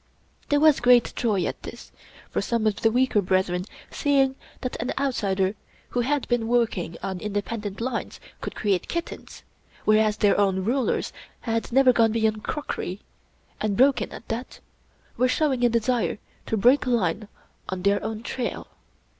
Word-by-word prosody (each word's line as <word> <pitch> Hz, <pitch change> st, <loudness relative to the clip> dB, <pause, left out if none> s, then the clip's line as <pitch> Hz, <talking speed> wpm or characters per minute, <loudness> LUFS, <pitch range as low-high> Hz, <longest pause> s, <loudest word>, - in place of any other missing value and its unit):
There 290 Hz, -, +3 dB
was 305 Hz, -1 st, +5 dB
great 245 Hz, 0 st, +4 dB
joy 210 Hz, -6 st, +1 dB
at -, -, -4 dB
this, -, -, -10 dB, 0.4 s
for -, -, 0 dB
some 230 Hz, -2 st, -1 dB
of 215 Hz, -2 st, +1 dB
the 225 Hz, -, +3 dB
weaker 245 Hz, -2 st, +2 dB
brethren 185 Hz, -1 st, 0 dB, 0.3 s
see 285 Hz, -1 st, +1 dB
ing 265 Hz, 0 st, +2 dB, 0.3 s
that 255 Hz, -, -3 dB
an 245 Hz, -, -2 dB
outsider 200 Hz, -8 st, 0 dB, 0.4 s
who 245 Hz, -, -2 dB
had 280 Hz, +3 st, 0 dB
been 240 Hz, -2 st, 0 dB
working 225 Hz, -8 st, 0 dB
on 190 Hz, -2 st, -3 dB
independent 205 Hz, 0 st, -4 dB
lines 240 Hz, 0 st, -3 dB, 0.2 s
could -, -, -5 dB
create 195 Hz, -5 st, 0 dB
kittens, 340 Hz, 0 st, -6 dB, 0.4 s
whereas 215 Hz, 0 st, +3 dB
their 205 Hz, -1 st, +3 dB
own 190 Hz, -2 st, +1 dB
rulers 250 Hz, +3 st, 0 dB, 0.3 s
had 230 Hz, 0 st, -2 dB
never 260 Hz, 0 st, +5 dB
gone 225 Hz, -2 st, +3 dB
beyond 220 Hz, -2 st, 0 dB
crockery 205 Hz, -, -4 dB, 0.3 s
— -, -, -27 dB
^and 210 Hz, -2 st, 0 dB
broken 265 Hz, +4 st, +3 dB
at -, -, -10 dB
that 230 Hz, +3 st, -5 dB, 0.3 s
— -, -, -29 dB
^were 255 Hz, +1 st, +3 dB
showing 265 Hz, -3 st, +1 dB
a 240 Hz, -, +5 dB
desire 235 Hz, 0 st, 0 dB, 0.3 s
to 220 Hz, -, 0 dB
break 250 Hz, +7 st, +4 dB
line 215 Hz, -4 st, 0 dB, 0.4 s
on 185 Hz, -1 st, -4 dB
their 200 Hz, +1 st, +2 dB
own 220 Hz, +1 st, -4 dB
trail. 245 Hz, +1 st, -4 dB
225 Hz, 165 wpm, -25 LUFS, 205-250 Hz, 0.4 s, was